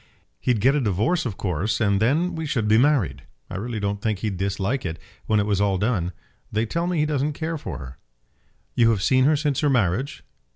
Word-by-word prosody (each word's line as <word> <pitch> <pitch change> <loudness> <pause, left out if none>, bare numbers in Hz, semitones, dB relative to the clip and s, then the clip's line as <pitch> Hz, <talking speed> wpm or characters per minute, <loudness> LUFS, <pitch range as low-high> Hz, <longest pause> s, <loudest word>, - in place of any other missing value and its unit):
"He'd 120 -5 +1
get 130 +5 +5
a 145 - +1
divorce, 115 - +1
of 100 -5 -6
course, 95 +3 -1
and 100 -3 +2
then 160 +10 +2
we 160 -1 -4
should 115 -7 0
be 110 +1 +5
married. 120 - +2 0.3
I 95 - -4
really 115 +2 -3
don't 100 0 -2
think 110 -1 0
he'd 100 0 -3
dislike 100 +7 -1
it, 85 -2 -4 0.3
when 110 -1 +3
it 100 - +1
was 100 -2 +1
all 100 -2 +2
done. 95 -4 0 0.4
They 110 +2 +1
tell 170 +9 -2
me 180 -1 0
he 150 - +3
doesn't 150 0 0
care 165 +2 -3
for 85 - -5
her." 65 -3 -9 0.8
"You 115 -1 +4
have 105 -4 +1
seen 130 +4 +4
her 155 +2 +4
since 145 -2 0
her 150 - +2
marriage?" 125 +1 0
110 Hz, 220 wpm, -24 LUFS, 100-140 Hz, 0.8 s, get